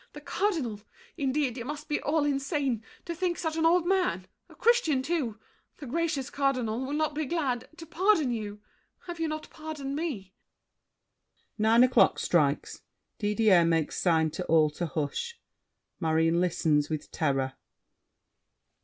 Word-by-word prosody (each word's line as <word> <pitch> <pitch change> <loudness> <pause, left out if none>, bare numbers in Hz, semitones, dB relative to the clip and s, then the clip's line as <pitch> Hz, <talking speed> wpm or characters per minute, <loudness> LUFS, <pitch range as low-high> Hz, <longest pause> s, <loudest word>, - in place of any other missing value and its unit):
The 295 - -8
Cardinal! 295 - -1 0.3
Indeed, 275 -4 0
you 235 - -4
must 295 +2 -6
be 295 - -1
all 300 0 +1
insane, 275 - -1 0.2
To 340 - -3
think 345 0 -1
such 320 -2 -2
an 325 0 +3
old 345 0 +3
man—a 375 0 -2
Christian 385 - +3
too, 265 -9 -2 0.4
The 295 - -9
gracious 285 -1 -2
Cardinal—will 260 -2 -1
not 305 0 0
be 305 -1 -2
glad 265 -7 -1
To 330 - -9
pardon 345 -4 +2
you. 210 -2 -5 0.4
Have 345 -1 -7
you 325 - 0
not 310 0 -5
pardoned 300 -3 -6
me? 250 - -4 1.3
[Nine 225 +3 +5
o'clock 245 -6 +4
strikes. 150 -4 +1 0.4
Didier 210 -4 +4
makes 165 -2 0
sign 160 -3 +3
to 180 +3 -4
all 155 -2 +4
to 170 +3 -3
hush. 160 - -3 0.6
Marion 165 +1 +2
listens 155 -4 +1
with 155 -2 -4
terror. 135 -4 0
265 Hz, 140 wpm, -28 LUFS, 185-315 Hz, 1.3 s, Nine